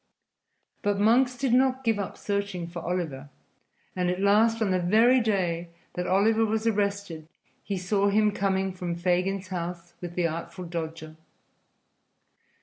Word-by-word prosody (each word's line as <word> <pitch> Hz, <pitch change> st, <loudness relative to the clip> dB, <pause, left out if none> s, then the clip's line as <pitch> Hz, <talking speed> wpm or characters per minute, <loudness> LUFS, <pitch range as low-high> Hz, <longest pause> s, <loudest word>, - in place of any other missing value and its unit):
But 205 Hz, -1 st, 0 dB
Monks 245 Hz, +4 st, +3 dB
did 260 Hz, -2 st, 0 dB
not 260 Hz, +1 st, +3 dB
give 225 Hz, -3 st, +1 dB
up 200 Hz, -, -4 dB
searching 200 Hz, -4 st, -2 dB
for 170 Hz, +1 st, -7 dB
Oliver, 160 Hz, -6 st, -3 dB, 0.7 s
and 180 Hz, -1 st, 0 dB
at 180 Hz, +1 st, -1 dB
last, 215 Hz, +3 st, +4 dB
on 215 Hz, -4 st, +1 dB
the 185 Hz, -, +2 dB
very 225 Hz, +8 st, +4 dB
day 175 Hz, -6 st, -1 dB, 0.2 s
that 180 Hz, 0 st, -3 dB
Oliver 220 Hz, +4 st, +3 dB
was 220 Hz, 0 st, 0 dB
arrested, 200 Hz, -7 st, -1 dB, 0.4 s
he 200 Hz, -1 st, -3 dB
saw 195 Hz, +2 st, +1 dB
him 210 Hz, +1 st, +3 dB
coming 190 Hz, -1 st, 0 dB
from 180 Hz, -2 st, -4 dB
Fagin's 185 Hz, +2 st, 0 dB
house 175 Hz, -1 st, -5 dB
with 175 Hz, -1 st, -6 dB
the 180 Hz, -, +1 dB
Artful 170 Hz, +3 st, -4 dB
Dodger. 160 Hz, -2 st, -6 dB
190 Hz, 145 wpm, -27 LUFS, 175-215 Hz, 0.7 s, last